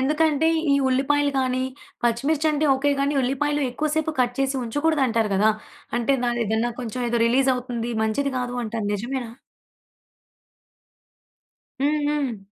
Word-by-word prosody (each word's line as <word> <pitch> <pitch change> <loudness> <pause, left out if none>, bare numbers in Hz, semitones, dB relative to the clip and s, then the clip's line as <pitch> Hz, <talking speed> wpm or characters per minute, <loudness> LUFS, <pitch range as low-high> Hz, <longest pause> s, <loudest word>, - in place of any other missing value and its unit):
ఎందుకంటే, 305 +2 +2 0.2
ఈ - - +5
ఉల్లిపాయలు 285 +2 +2
గానీ, 255 0 0 0.4
పచ్చిమిర్చంటే 295 +6 +1
ఓకే 280 +2 +1
గానీ, 280 +1 +1
ఉల్లిపాయలు 290 +3 0
ఎక్కువ 305 +5 -2
సేపు 315 0 0
కట్ 245 0 +1
చేసి 270 0 0
ఉంచకూడదంటారు 255 -4 +1
గదా! 210 +3 +4 0.5
అంటే, 240 +3 +2
దాని 240 0 0
ఏదన్నా 220 +3 0
కొంచెం 245 0 -5
ఏదో 235 0 0
రిలీజవుతుంది, 250 -1 0
మంచిది 275 +6 -1
కాదు 245 0 -3
అంటారు 220 -2 -3
నిజమేనా? 240 +3 -4 2.5
హ్మ్. 300 +2 +2
హ్మ్. 280 -7 -1
260 Hz, 125 wpm, -23 LUFS, 240-290 Hz, 2.5 s, ఈ